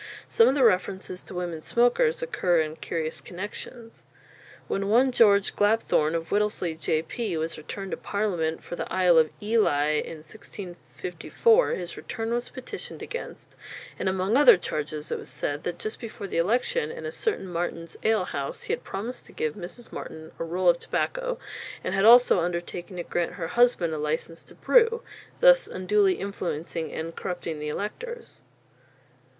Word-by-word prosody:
Some 455 Hz, -, +5 dB
of 270 Hz, -, +3 dB
the 275 Hz, -, +3 dB
references 190 Hz, -3 st, +1 dB
to -, -, -10 dB
women 175 Hz, -3 st, -3 dB
smokers 245 Hz, -, +2 dB
occur 180 Hz, -, +2 dB
in 155 Hz, 0 st, -4 dB
curious 160 Hz, -1 st, -3 dB
connexions. 215 Hz, +5 st, -8 dB, 0.7 s
When 195 Hz, 0 st, -1 dB
one 250 Hz, +5 st, +5 dB
George 205 Hz, -5 st, +4 dB
Glapthorne, 205 Hz, -7 st, +2 dB
of 165 Hz, 0 st, -3 dB
Whittlesey, 205 Hz, -5 st, +1 dB
J.P., 160 Hz, -, -2 dB
was 160 Hz, +1 st, -2 dB
returned 195 Hz, +5 st, -7 dB
to -, -, -2 dB
Parliament 175 Hz, -6 st, -1 dB
for -, -, -6 dB
the -, -, -5 dB
Isle 180 Hz, -3 st, +5 dB
of 155 Hz, -1 st, +3 dB
Ely 205 Hz, -10 st, +2 dB
in 165 Hz, -, -5 dB
1654, 190 Hz, -, -1 dB
his 175 Hz, -2 st, -6 dB
return 225 Hz, -1 st, -4 dB
was 240 Hz, 0 st, -2 dB
petitioned 260 Hz, -1 st, -8 dB
against, 480 Hz, -, -7 dB, 0.4 s
and 190 Hz, -, +1 dB
among 190 Hz, +4 st, 0 dB
other 275 Hz, -6 st, +8 dB
charges 150 Hz, -3 st, -4 dB
it -, -, -1 dB
was -, -, -8 dB
said 145 Hz, 0 st, -2 dB
that 175 Hz, -1 st, -2 dB
just 215 Hz, +4 st, -5 dB
before 220 Hz, -3 st, -7 dB
the 195 Hz, -, -3 dB
election, 350 Hz, -, +1 dB
in 475 Hz, +1 st, -7 dB
a 460 Hz, -, -3 dB
certain 440 Hz, -, -1 dB
Martin's 170 Hz, -1 st, -4 dB
ale 220 Hz, -4 st, +2 dB
house, 140 Hz, -4 st, -4 dB
he -, -, -2 dB
had -, -, -3 dB
promised 225 Hz, +6 st, -6 dB
to -, -, -16 dB
give 155 Hz, -1 st, -1 dB
Mrs. 205 Hz, +5 st, -9 dB
Martin 160 Hz, 0 st, -8 dB
a -, -, -1 dB
roll 180 Hz, +2 st, -1 dB
of 170 Hz, -1 st, +5 dB
tobacco, -, -, -2 dB, 0.5 s
and -, -, -2 dB
had 195 Hz, +1 st, +2 dB
also 240 Hz, -3 st, +8 dB
undertaken 175 Hz, +1 st, -3 dB
to 175 Hz, -, -3 dB
grant 175 Hz, 0 st, -2 dB
her 170 Hz, -3 st, -4 dB
husband 235 Hz, -7 st, +3 dB
a 155 Hz, -, -3 dB
licence 155 Hz, +2 st, -3 dB
to -, -, -15 dB
brew, 465 Hz, 0 st, +4 dB, 0.4 s
thus -, -, +7 dB
unduly 195 Hz, 0 st, +2 dB
influencing 170 Hz, -4 st, -4 dB
and 165 Hz, +1 st, -5 dB
corrupting 170 Hz, -3 st, -4 dB
the 150 Hz, 0 st, -3 dB
electors. 470 Hz, -, -6 dB
185 Hz, 165 wpm, -26 LUFS, 165-235 Hz, 0.7 s, other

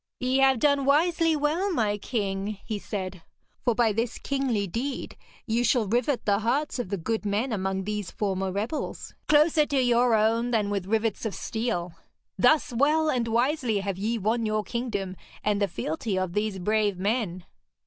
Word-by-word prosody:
'Ye 255 Hz, +1 st, +1 dB
have 265 Hz, -1 st, +5 dB
done 285 Hz, +2 st, +3 dB
wisely 325 Hz, +3 st, +3 dB
well, 310 Hz, +7 st, 0 dB
my 215 Hz, -, +1 dB
king,' 200 Hz, -2 st, -3 dB
he 215 Hz, -3 st, -3 dB
said. 190 Hz, -4 st, -5 dB, 0.4 s
'For 240 Hz, -3 st, +2 dB
by 230 Hz, -2 st, +3 dB
this 230 Hz, +2 st, -2 dB
kingly 265 Hz, -7 st, -1 dB
deed 250 Hz, +8 st, -4 dB, 0.3 s
you 235 Hz, +1 st, +1 dB
shall 240 Hz, -3 st, +2 dB
rivet 245 Hz, +5 st, 0 dB
the 200 Hz, -1 st, +3 dB
hearts 265 Hz, +6 st, 0 dB
of 240 Hz, -, -3 dB
the 200 Hz, -, -1 dB
good 220 Hz, +6 st, -2 dB
men 215 Hz, +5 st, -1 dB
among 190 Hz, -1 st, -1 dB
these 210 Hz, -1 st, -3 dB
former 195 Hz, -2 st, -2 dB
rebels 215 Hz, +10 st, -4 dB
closer 300 Hz, 0 st, +4 dB
to 280 Hz, -, +1 dB
your 245 Hz, -1 st, +4 dB
own 225 Hz, +3 st, +2 dB
than 215 Hz, -4 st, +1 dB
with 195 Hz, -2 st, -2 dB
rivets 220 Hz, 0 st, 0 dB
of 220 Hz, -3 st, -3 dB
steel. 220 Hz, -7 st, -3 dB, 0.4 s
Thus 310 Hz, -5 st, +3 dB
well 305 Hz, +5 st, +3 dB
and 240 Hz, -2 st, 0 dB
wisely 240 Hz, -2 st, +1 dB
have 195 Hz, -1 st, -3 dB
ye 225 Hz, +4 st, 0 dB
won 225 Hz, +3 st, 0 dB
your 215 Hz, -1 st, 0 dB
kingdom 205 Hz, -7 st, -3 dB, 0.3 s
and 205 Hz, -1 st, +1 dB
the 200 Hz, -, +3 dB
fealty 185 Hz, +3 st, -3 dB
of 185 Hz, -2 st, -1 dB
these 210 Hz, -1 st, -1 dB
brave 210 Hz, +1 st, +1 dB
men.' 190 Hz, -3 st, -1 dB
225 Hz, 175 wpm, -26 LUFS, 200-255 Hz, 0.4 s, have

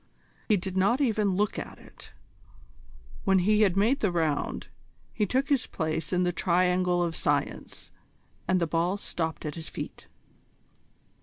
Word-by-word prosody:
He 210 Hz, -, +5 dB
did 190 Hz, 0 st, -5 dB
not 200 Hz, +7 st, +3 dB
even 215 Hz, -8 st, +1 dB
look 205 Hz, +2 st, 0 dB
at -, -, -7 dB
it. -, -, -15 dB, 1.1 s
When 195 Hz, -2 st, +4 dB
he 210 Hz, +4 st, +3 dB
had 195 Hz, -3 st, +3 dB
made 230 Hz, +8 st, +3 dB
the 205 Hz, -, +1 dB
round, 160 Hz, -4 st, -1 dB, 0.5 s
he 210 Hz, -2 st, 0 dB
took 265 Hz, +6 st, 0 dB
his 275 Hz, -4 st, +2 dB
place 160 Hz, -1 st, -3 dB
in 180 Hz, 0 st, +2 dB
the 180 Hz, -, +1 dB
Triangle 180 Hz, +1 st, +2 dB
of 165 Hz, -1 st, -2 dB
Science, 145 Hz, -1 st, -2 dB, 0.6 s
and 185 Hz, -1 st, +3 dB
the 170 Hz, -, +1 dB
ball 170 Hz, +4 st, 0 dB
stopped 160 Hz, -6 st, -4 dB
at 150 Hz, -, -3 dB
his 160 Hz, 0 st, -6 dB
feet. -, -, -7 dB
185 Hz, 155 wpm, -28 LUFS, 170-210 Hz, 1.1 s, He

